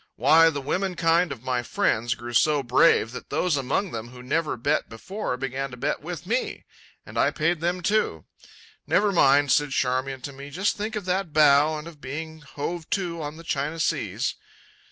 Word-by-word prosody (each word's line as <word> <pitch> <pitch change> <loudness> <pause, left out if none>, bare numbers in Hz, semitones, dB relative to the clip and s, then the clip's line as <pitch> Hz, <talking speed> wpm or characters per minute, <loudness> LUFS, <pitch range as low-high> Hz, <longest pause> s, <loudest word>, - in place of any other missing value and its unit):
Why, 165 +1 +6
the 145 -3 -4
women 180 +7 -1
kind 170 +1 +2
of 115 - -7
my 130 -1 0
friends 120 0 0
grew 120 0 -8
so 145 +4 +3
brave 125 -2 +4
that 125 - -9
those 180 -4 +1
among 140 +8 -1
them 115 0 -5
who 125 0 -12
never 150 +2 -1
bet 115 - 0
before 125 - -4
began 135 +1 -3
to 125 - -10
bet 140 +4 -2
with 170 +1 -6
me. 240 +7 -2 0.4
And - - -5
I - - +4
paid 170 +1 0
them, 175 +1 -1
too. 185 - 0 0.6
"Never 205 0 +3
mind," 145 -5 +4
said 145 +2 +3
Charmian 130 0 -1
to 140 +2 -7
me; 140 +1 -9
"just 185 +8 0
think 215 +2 -4
of 210 -3 -4
that 185 -3 -1
bow 150 0 +5
and 150 +2 -8
of 155 -4 -12
being 160 +4 -6
hove 155 +3 -5
to 175 -4 -2
on 150 +1 -6
the 165 - -11
China 150 +1 -2
Seas." - - -1
150 Hz, 195 wpm, -25 LUFS, 135-170 Hz, 0.6 s, Why